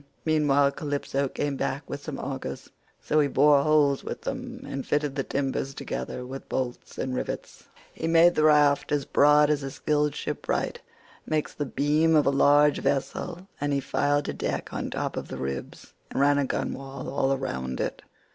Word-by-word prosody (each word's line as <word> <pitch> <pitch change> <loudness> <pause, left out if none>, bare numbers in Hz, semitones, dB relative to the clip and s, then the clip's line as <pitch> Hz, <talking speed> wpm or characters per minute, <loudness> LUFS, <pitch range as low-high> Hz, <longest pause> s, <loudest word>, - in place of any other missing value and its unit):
Meanwhile 145 -3 +3
Calypso 140 -1 -2
came 145 +1 -2
back 140 +2 -3
with 140 - -5
some 145 -2 -6
augers, 135 -1 -6 0.3
so 155 - +1
he 145 - +4
bored 140 +1 +5
holes 150 -3 +3
with - - -5
them 255 -1 -5
and 135 - -4
fitted 145 -1 0
the 135 - -1
timbers 135 0 -2
together 125 - -5
with 135 +2 -8
bolts 125 -2 -4
and 130 - -2
rivets. 125 - -5 0.3
He 165 - -3
made 165 +1 +6
the 155 - +1
raft 145 -2 +4
as 145 -2 +1
broad 150 +1 +5
as 150 -1 +1
a 135 - -4
skilled 150 +1 0
shipwright - - -2 0.5
makes 155 -1 -1
the 145 - -3
beam 150 +4 +2
of 150 - +4
a - - +4
large 145 +1 +4
vessel, 175 +6 -2
and 145 0 0
he 140 - +2
fixed 145 +1 0
a - - -2
deck - - -3
on - - -3
top - - -3
of - - -4
the - - -6
ribs, 65 0 -6 0.2
and - - -3
ran 145 +1 +4
a 140 - +1
gunwale 135 0 -4
all 135 0 +1
round 65 - -4
it. - - -3
145 Hz, 185 wpm, -26 LUFS, 135-150 Hz, 0.5 s, made